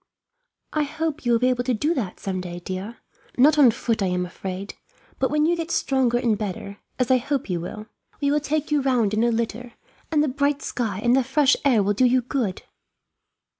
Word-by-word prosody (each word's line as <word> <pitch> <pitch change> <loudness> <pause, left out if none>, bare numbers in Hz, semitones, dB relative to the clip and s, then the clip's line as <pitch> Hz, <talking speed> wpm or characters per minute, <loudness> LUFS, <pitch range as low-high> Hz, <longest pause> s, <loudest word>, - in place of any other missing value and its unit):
"I 310 - +1
hope 310 0 -3
you - - +3
will 235 - +5
be 250 +2 +2
able 245 -1 0
to 250 -1 0
do 300 +9 +1
that, 220 - -4
some 190 -2 -3
day, 175 -1 -6
dear. 190 +6 -6 0.4
Not 295 +4 +5
on 270 -4 +8
foot, 230 -1 -1
I 195 - +2
am 180 0 -1
afraid; 190 +2 -6 0.5
but 265 - +1
when 300 +1 +2
you 345 +2 +2
get 335 -1 -4
stronger 260 -7 +1
and 235 -3 +1
better, 200 -1 -5 0.2
as 255 -1 +1
I 260 - +6
hope 260 -4 -2
you 175 - -1
will, 215 +5 -7 0.3
we 285 -1 +1
will 300 - +3
take 300 +1 -2
you 295 -1 +3
round 245 -6 +1
in 215 +2 +2
a 240 - +3
litter, 235 +1 -3 0.4
and 300 -2 +3
the - - +1
bright 280 +1 0
sky 215 -6 -3
and 240 +1 +4
the 265 - +3
fresh 275 +2 +3
air 245 -7 +4
will 205 +1 +1
do 255 +5 +3
you 250 0 +3
good." 235 -7 -2
245 Hz, 220 wpm, -23 LUFS, 210-280 Hz, 0.5 s, on